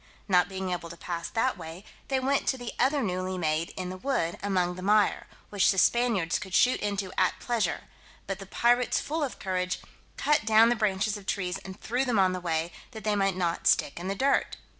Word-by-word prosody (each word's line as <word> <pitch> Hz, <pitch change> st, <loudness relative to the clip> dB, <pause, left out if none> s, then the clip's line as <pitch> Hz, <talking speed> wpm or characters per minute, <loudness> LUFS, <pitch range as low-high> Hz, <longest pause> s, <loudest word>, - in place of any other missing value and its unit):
Not 180 Hz, -2 st, +3 dB
being 190 Hz, -1 st, -4 dB
able 170 Hz, -1 st, -4 dB
to 170 Hz, -, -10 dB
pass 170 Hz, -1 st, -4 dB
that 230 Hz, -2 st, 0 dB
way, 165 Hz, +4 st, -9 dB, 0.2 s
they 265 Hz, -1 st, +1 dB
went 270 Hz, +2 st, 0 dB
to 265 Hz, -, +1 dB
the 245 Hz, -2 st, -6 dB
other 275 Hz, +2 st, +2 dB
newly 185 Hz, -1 st, -2 dB
made 160 Hz, -1 st, 0 dB
in 185 Hz, -1 st, -4 dB
the 185 Hz, -, -6 dB
wood 185 Hz, -7 st, -1 dB
among 185 Hz, -3 st, 0 dB
the 185 Hz, -, -8 dB
mire, 210 Hz, +2 st, +2 dB, 0.2 s
which 200 Hz, -2 st, +3 dB
the 195 Hz, -, +2 dB
Spaniards 220 Hz, -6 st, +2 dB
could 190 Hz, -2 st, -5 dB
shoot 250 Hz, -, +4 dB
into 200 Hz, -2 st, -2 dB
at -, -, +2 dB
pleasure; 225 Hz, -8 st, -1 dB, 0.4 s
but 195 Hz, 0 st, -4 dB
the 195 Hz, -, -9 dB
pirates, 240 Hz, +4 st, +2 dB
full 315 Hz, +1 st, -2 dB
of 270 Hz, -, -4 dB
courage, 185 Hz, -1 st, -2 dB, 0.4 s
cut 295 Hz, 0 st, +2 dB
down 220 Hz, +1 st, +6 dB
the 240 Hz, -, +2 dB
branches 210 Hz, -1 st, 0 dB
of 200 Hz, -1 st, -13 dB
trees 185 Hz, -2 st, -2 dB
and 190 Hz, +1 st, -10 dB
threw 245 Hz, +4 st, -1 dB
them 245 Hz, -4 st, 0 dB
on 185 Hz, -1 st, +4 dB
the 185 Hz, -, -4 dB
way, 165 Hz, -1 st, -1 dB, 0.2 s
that 220 Hz, -, -8 dB
they 210 Hz, -1 st, +1 dB
might 195 Hz, -2 st, +1 dB
not 170 Hz, -2 st, -1 dB
stick 140 Hz, -, +2 dB
in 180 Hz, -, -5 dB
the 195 Hz, -, -1 dB
dirt. 275 Hz, +6 st, +1 dB
195 Hz, 220 wpm, -28 LUFS, 180-235 Hz, 0.4 s, down